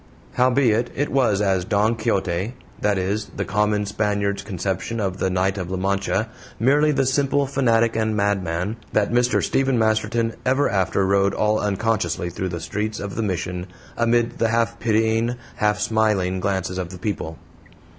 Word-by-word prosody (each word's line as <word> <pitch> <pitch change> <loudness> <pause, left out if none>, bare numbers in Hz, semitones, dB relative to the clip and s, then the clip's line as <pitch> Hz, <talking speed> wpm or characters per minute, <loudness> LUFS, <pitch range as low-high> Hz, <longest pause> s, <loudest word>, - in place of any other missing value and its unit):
Howbeit 125 -2 +3
it 145 +2 -1
was 120 -7 +2
as 95 -2 +1
"Don 105 +5 +1
Quixote" 100 -1 -1 0.3
that 105 -1 +2
is, 100 +3 -1
the - - -1
common 105 +1 +1
Spaniard's 100 -1 -1
conception 95 +3 -3
of 95 -3 -2
the 95 - 0
Knight 95 +1 0
of 90 -2 -4
La 95 - -2
Mancha, 100 +3 0 0.3
merely 145 +5 +4
the 135 -2 +1
simple 140 +1 +2
fanatic 115 -4 +2
and 110 -1 0
madman 100 0 -1 0.2
that 105 0 +2
Mr. 120 +1 +2
Stephen 135 -2 +1
Masterton 110 +1 +1
ever 135 +3 +2
after 95 0 +1
rode 100 +1 +2
all 105 0 +2
unconsciously 105 -3 -1
through 95 +2 -3
the 85 -1 -4
streets 105 +6 -3
of 100 -1 -5
the 115 - -1
Mission, 90 -2 -3 0.3
amid 120 0 +1
the 115 - +2
half 115 0 0
pitying, 115 +1 +1 0.2
half 105 0 +1
smiling 105 -5 +1
glances 95 -1 -1
of 90 -2 -3
the 90 - -9
people. 85 -5 -4
105 Hz, 165 wpm, -22 LUFS, 95-115 Hz, 0.3 s, merely